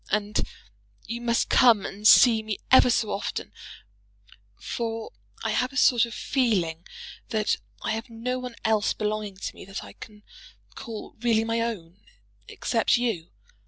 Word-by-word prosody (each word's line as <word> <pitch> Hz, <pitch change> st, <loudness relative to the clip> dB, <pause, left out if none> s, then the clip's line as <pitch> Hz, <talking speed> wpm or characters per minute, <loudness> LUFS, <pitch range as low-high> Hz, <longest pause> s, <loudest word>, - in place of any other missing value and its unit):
And 210 Hz, 0 st, -1 dB, 0.6 s
you 235 Hz, +1 st, -5 dB
must 235 Hz, -1 st, +1 dB
come 230 Hz, -6 st, +5 dB
and 210 Hz, +2 st, -1 dB
see 230 Hz, -2 st, +7 dB
me 215 Hz, -2 st, -4 dB
ever 255 Hz, -1 st, +7 dB
so 230 Hz, -3 st, +1 dB
often; 200 Hz, -, -4 dB, 1.1 s
for 225 Hz, -1 st, -4 dB, 0.3 s
I 225 Hz, -, 0 dB
have 250 Hz, +4 st, 0 dB
a 275 Hz, -, -7 dB
sort 240 Hz, -4 st, +4 dB
of 230 Hz, -, -9 dB
feeling 185 Hz, -, 0 dB, 0.4 s
that 215 Hz, -1 st, 0 dB, 0.3 s
I -, -, -1 dB
have 225 Hz, +3 st, -4 dB
no 245 Hz, +3 st, -3 dB
one 250 Hz, -2 st, -7 dB
else 220 Hz, -1 st, +2 dB
belonging 210 Hz, -2 st, -3 dB
to -, -, -5 dB
me -, -, -12 dB
that 195 Hz, +1 st, -7 dB
I -, -, -12 dB
can 210 Hz, -1 st, -13 dB, 0.5 s
call 230 Hz, -5 st, -8 dB
really 225 Hz, -2 st, +2 dB
my 230 Hz, +1 st, -1 dB
own, 195 Hz, -7 st, -5 dB, 0.5 s
except -, -, +1 dB
you. 225 Hz, -9 st, -2 dB
225 Hz, 155 wpm, -26 LUFS, 210-235 Hz, 1.1 s, see